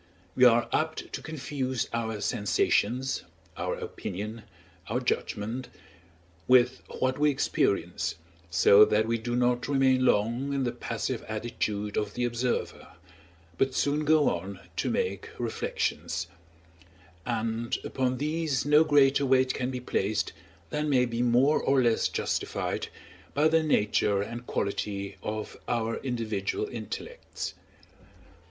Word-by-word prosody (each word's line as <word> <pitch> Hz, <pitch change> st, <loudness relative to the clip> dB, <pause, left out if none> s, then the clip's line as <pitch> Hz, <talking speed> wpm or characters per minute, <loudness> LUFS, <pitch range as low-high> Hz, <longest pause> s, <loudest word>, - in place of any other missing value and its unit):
We 130 Hz, -, +5 dB
are 120 Hz, -1 st, +5 dB
apt 155 Hz, 0 st, -1 dB
to -, -, -4 dB
confuse 135 Hz, -5 st, -3 dB
our 110 Hz, -2 st, -2 dB
sensations, 115 Hz, +5 st, +1 dB, 0.3 s
our 90 Hz, +1 st, -2 dB
opinion, 105 Hz, +4 st, -6 dB, 0.5 s
our 120 Hz, +3 st, 0 dB
judgment, 125 Hz, 0 st, -2 dB, 0.8 s
with 125 Hz, 0 st, +5 dB, 0.2 s
what 130 Hz, +1 st, 0 dB
we 150 Hz, 0 st, +4 dB
experience, 100 Hz, -, 0 dB, 0.3 s
so 95 Hz, +5 st, +7 dB
that 105 Hz, +1 st, +3 dB
we 115 Hz, 0 st, 0 dB
do 120 Hz, +2 st, -3 dB
not 125 Hz, 0 st, +1 dB
remain 130 Hz, -2 st, +3 dB
long 120 Hz, +5 st, +1 dB
in 135 Hz, -1 st, 0 dB
the 120 Hz, -, 0 dB
passive -, -, -3 dB
attitude 105 Hz, -2 st, -3 dB
of 105 Hz, -1 st, -2 dB
the 125 Hz, -, 0 dB
observer, 120 Hz, +1 st, -2 dB, 0.7 s
but 135 Hz, -1 st, +1 dB
soon 145 Hz, +2 st, +1 dB
go 155 Hz, 0 st, +4 dB
on 95 Hz, +2 st, -2 dB, 0.2 s
to -, -, 0 dB
make 95 Hz, +1 st, -2 dB
reflections; 85 Hz, -7 st, -2 dB, 1.0 s
and 115 Hz, +1 st, -1 dB
upon 130 Hz, -1 st, -1 dB
these 150 Hz, -2 st, -1 dB
no 150 Hz, +2 st, +6 dB
greater 140 Hz, -2 st, +4 dB
weight 130 Hz, -1 st, +3 dB
can 125 Hz, 0 st, -2 dB
be 130 Hz, -1 st, -3 dB
placed 105 Hz, -3 st, -1 dB, 0.4 s
than 150 Hz, 0 st, -1 dB
may 125 Hz, -3 st, +4 dB
be 120 Hz, 0 st, -2 dB
more 125 Hz, +5 st, +4 dB
or 135 Hz, 0 st, +3 dB
less 120 Hz, -3 st, +3 dB
justified -, -, -2 dB, 0.5 s
by 150 Hz, +2 st, +4 dB
the 160 Hz, 0 st, +4 dB
nature 105 Hz, -8 st, +2 dB
and 120 Hz, +3 st, -7 dB
quality 100 Hz, 0 st, -2 dB
of 110 Hz, 0 st, -5 dB
our 115 Hz, -1 st, 0 dB
individual 115 Hz, -, -2 dB
intellects. 485 Hz, +4 st, -6 dB
120 Hz, 130 wpm, -28 LUFS, 105-135 Hz, 1.0 s, so